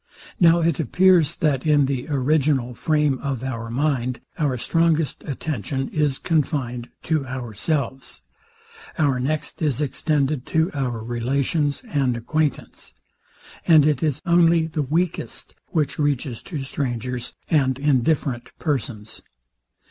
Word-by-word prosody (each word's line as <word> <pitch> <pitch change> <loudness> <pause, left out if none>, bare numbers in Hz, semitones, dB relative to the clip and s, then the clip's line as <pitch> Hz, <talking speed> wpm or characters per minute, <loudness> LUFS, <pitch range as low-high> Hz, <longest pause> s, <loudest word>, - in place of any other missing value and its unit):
Now 170 -1 +6
it 165 -3 +1
appears, 170 +2 +4
that 140 -4 +1
in 150 -2 +4
the 135 -1 -2
original 140 -2 +1
frame 150 0 +1
of 135 -3 -3
our 115 -3 -4
mind, 130 -1 0 0.2
our 140 -5 +1
strongest 165 +3 +1
attention 135 -2 -3
is 150 -3 0
confined 135 -7 -1
to 155 -3 0
ourselves; 130 +2 -3 0.7
our 140 -6 +2
next 150 +6 -2
is 145 -5 0
extended 145 -1 0
to 160 +2 +1
our 125 -6 -2
relations 135 - -1
and 135 - 0
acquaintance; 150 +5 -2 0.7
and 155 -4 +7
it 150 -4 +2
is 150 -5 -1
only 170 -2 +4
the 155 -1 -2
weakest 160 +5 -2
which 150 -3 -1
reaches 140 -5 -1
to 150 -7 -4
strangers 125 -3 -3
and 130 -5 +2
indifferent 135 -2 +1
persons. 120 -8 -3
140 Hz, 120 wpm, -23 LUFS, 130-155 Hz, 0.7 s, and